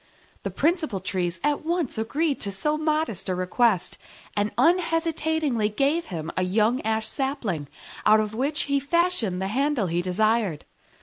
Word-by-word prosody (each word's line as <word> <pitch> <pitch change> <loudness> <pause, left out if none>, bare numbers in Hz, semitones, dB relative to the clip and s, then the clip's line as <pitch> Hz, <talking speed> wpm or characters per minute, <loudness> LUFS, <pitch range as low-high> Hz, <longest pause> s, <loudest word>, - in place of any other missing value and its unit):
The - - -3
principal 310 - 0
Trees 180 -2 -2
at 295 0 +1
once 335 -3 -1
agreed 280 +7 -1
to 200 - 0
so 300 +11 0
modest 310 - -1
a 185 - +1
request, 185 +2 +1 0.4
and 205 0 0
unhesitatingly 320 - +1
gave 280 +10 0
him 165 -2 -5
a - - 0
young 215 +7 +2
ash 220 0 0
sapling, 245 - -2 0.4
out 215 +1 +6
of 215 0 -1
which 280 +6 0
he 280 -1 +1
fashioned 285 - +1
the 190 0 -2
handle 270 -1 +1
he 170 0 0
desired. 200 -2 +1
235 Hz, 150 wpm, -25 LUFS, 195-305 Hz, 0.4 s, out